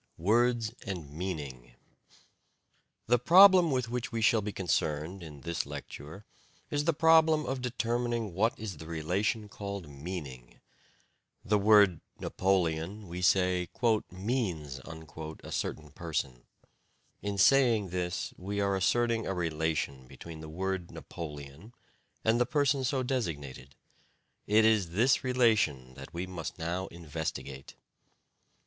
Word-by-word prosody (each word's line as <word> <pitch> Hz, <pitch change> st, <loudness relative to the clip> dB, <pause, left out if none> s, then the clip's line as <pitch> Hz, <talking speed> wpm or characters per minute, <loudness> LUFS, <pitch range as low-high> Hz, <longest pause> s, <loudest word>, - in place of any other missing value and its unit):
WORDS 115 Hz, +4 st, +2 dB
AND 90 Hz, -, -6 dB
MEANING 70 Hz, -8 st, -6 dB, 1.3 s
The 120 Hz, +1 st, +3 dB
problem 180 Hz, -, +8 dB
with 130 Hz, -4 st, 0 dB
which 120 Hz, +1 st, -3 dB
we 115 Hz, -, -2 dB
shall 115 Hz, 0 st, +4 dB
be 105 Hz, +1 st, -4 dB
concerned 80 Hz, -1 st, -1 dB
in 75 Hz, -4 st, -10 dB
this 85 Hz, +2 st, -2 dB
lecture 80 Hz, +9 st, -9 dB, 0.5 s
is 145 Hz, 0 st, 0 dB
the 165 Hz, -, +4 dB
problem 160 Hz, 0 st, +5 dB
of 130 Hz, -1 st, -3 dB
determining 120 Hz, -3 st, -1 dB
what 110 Hz, +6 st, +1 dB
is 105 Hz, -6 st, -6 dB
the 80 Hz, -, -10 dB
relation 95 Hz, +7 st, -1 dB
called 100 Hz, -4 st, -6 dB
"meaning." 70 Hz, -4 st, -8 dB, 0.9 s
The 105 Hz, 0 st, +3 dB
word 100 Hz, -4 st, +5 dB, 0.2 s
"Napoleon," 95 Hz, +1 st, 0 dB
we 90 Hz, +1 st, -5 dB
say, 90 Hz, -1 st, +2 dB, 0.4 s
"means" 90 Hz, -, -3 dB
a 80 Hz, -1 st, -9 dB
certain 75 Hz, -1 st, -3 dB
person. 70 Hz, -8 st, -4 dB, 0.8 s
In 100 Hz, -1 st, -3 dB
saying 115 Hz, -3 st, +4 dB
this, 90 Hz, 0 st, -3 dB
we 100 Hz, +3 st, -4 dB
are 100 Hz, -1 st, +1 dB
asserting 115 Hz, +5 st, +1 dB
a 95 Hz, -, -1 dB
relation 80 Hz, -5 st, -2 dB
between 80 Hz, +4 st, -10 dB
the 80 Hz, 0 st, -8 dB
word 95 Hz, +1 st, -3 dB
"Napoleon" 75 Hz, -, -9 dB, 0.5 s
and 115 Hz, +2 st, +3 dB
the 125 Hz, -, +2 dB
person 140 Hz, -1 st, +2 dB
so 130 Hz, 0 st, 0 dB
designated. 75 Hz, -, -4 dB, 0.7 s
It 110 Hz, +1 st, +5 dB
is 105 Hz, -7 st, +3 dB
this 120 Hz, +7 st, +3 dB
relation 110 Hz, -, +2 dB
that -, -, -10 dB
we 85 Hz, +2 st, -4 dB
must 90 Hz, -4 st, -6 dB
now 90 Hz, +3 st, -3 dB
investigate. 75 Hz, -4 st, -6 dB
95 Hz, 125 wpm, -30 LUFS, 80-115 Hz, 1.3 s, problem